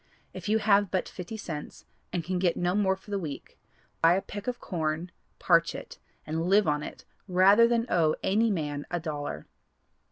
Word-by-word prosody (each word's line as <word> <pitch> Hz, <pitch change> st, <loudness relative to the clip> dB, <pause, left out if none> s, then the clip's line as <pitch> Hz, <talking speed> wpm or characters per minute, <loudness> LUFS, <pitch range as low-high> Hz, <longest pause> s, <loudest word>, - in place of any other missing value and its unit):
If -, -, -6 dB
you 220 Hz, -, +4 dB
have 205 Hz, -2 st, +3 dB
but 185 Hz, 0 st, -1 dB
fifty 185 Hz, +4 st, -7 dB
cents 155 Hz, -8 st, -7 dB, 0.3 s
and 175 Hz, -, -2 dB
can 185 Hz, +2 st, -2 dB
get 175 Hz, -2 st, +1 dB
no 175 Hz, 0 st, +1 dB
more 195 Hz, -1 st, +2 dB
for 190 Hz, +2 st, -15 dB
the 200 Hz, -, 0 dB
week, 150 Hz, -6 st, -7 dB, 0.4 s
buy 165 Hz, +2 st, +6 dB
a 195 Hz, -, 0 dB
peck 205 Hz, +1 st, -8 dB
of 250 Hz, -1 st, -2 dB
corn, 160 Hz, 0 st, -3 dB, 0.3 s
parch -, -, +3 dB
it, -, -, -9 dB, 0.3 s
and 160 Hz, +2 st, -2 dB
live 200 Hz, +1 st, +4 dB
on 150 Hz, -1 st, +1 dB
it -, -, -9 dB, 0.2 s
rather 195 Hz, +5 st, +6 dB
than 235 Hz, -1 st, +1 dB
owe 160 Hz, -7 st, +2 dB
any 220 Hz, +4 st, +2 dB
man 150 Hz, -6 st, -2 dB
a 175 Hz, -, -1 dB
dollar." 145 Hz, -, -5 dB
180 Hz, 190 wpm, -28 LUFS, 160-205 Hz, 0.4 s, buy